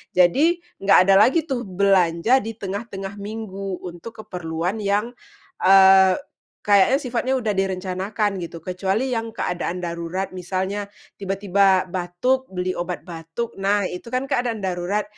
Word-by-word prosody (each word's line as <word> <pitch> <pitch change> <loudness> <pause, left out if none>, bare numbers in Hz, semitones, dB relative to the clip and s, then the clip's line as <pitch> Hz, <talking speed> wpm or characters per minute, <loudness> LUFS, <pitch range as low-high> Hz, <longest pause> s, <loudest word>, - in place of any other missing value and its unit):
Jadi, 295 - +3 0.2
enggak 195 0 +5
ada 195 0 +5
lagi 320 +4 +1
tuh, 250 -7 -4
belanja 190 +4 +3
di 225 -1 -6
tengah-tengah 200 -1 -6
minggu 200 -3 -6
untuk 200 +6 -9
keperluan 175 +1 -3
yang, 210 +3 0 0.5
eee, 190 0 +7 0.5
kayaknya, 210 +8 +4
sifatnya 250 +1 -1
udah 225 -5 -1
direncanakan, 195 +1 -2
gitu. 170 -1 -7
Kecuali 195 +8 -1
yang 225 -1 -3
keadaan 180 0 -3
darurat, 170 +3 -4
misalnya 190 +3 -3 0.3
tiba-tiba 195 -1 +2
batuk, 190 +10 -1
beli 185 0 -3
obat 175 -1 -4
batuk, 170 +6 -6
nah, 200 +1 +2
itu 180 - -8
kan 255 +2 -1
keadaan 245 -6 -2
darurat. 185 +3 -1
195 Hz, 130 wpm, -22 LUFS, 180-225 Hz, 0.5 s, eee